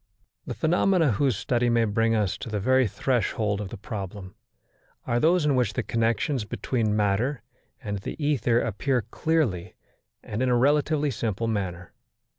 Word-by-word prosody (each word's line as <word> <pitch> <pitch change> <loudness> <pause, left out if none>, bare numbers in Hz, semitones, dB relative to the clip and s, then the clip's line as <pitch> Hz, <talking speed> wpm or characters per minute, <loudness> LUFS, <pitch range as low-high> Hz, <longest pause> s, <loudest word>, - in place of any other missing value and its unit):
The - - -4
phenomena 170 -2 +2
whose 125 0 +1
study 120 +2 0
may 115 -1 +3
bring 115 +2 +1
us 105 -4 0
to - - -6
the 105 -1 -2
very 130 +4 +3
threshold 105 -3 -1
of 100 - -5
the - - -8
problem, 95 -2 -7 0.7
are 120 - +1
those 165 +3 +3
in 145 -2 +3
which 120 -5 +1
the - - -2
connections 115 +3 0
between 110 0 -1
matter 105 +7 0 0.4
and 105 -1 -3
the - - -6
ether 130 -6 +1
appear 120 +4 -1
clearly 115 - -1 0.5
and 105 +3 -4
in 130 - +2
a 120 - +3
relatively 145 +2 +2
simple 115 -2 -2
manner. 95 -5 -3
115 Hz, 160 wpm, -26 LUFS, 105-135 Hz, 0.7 s, may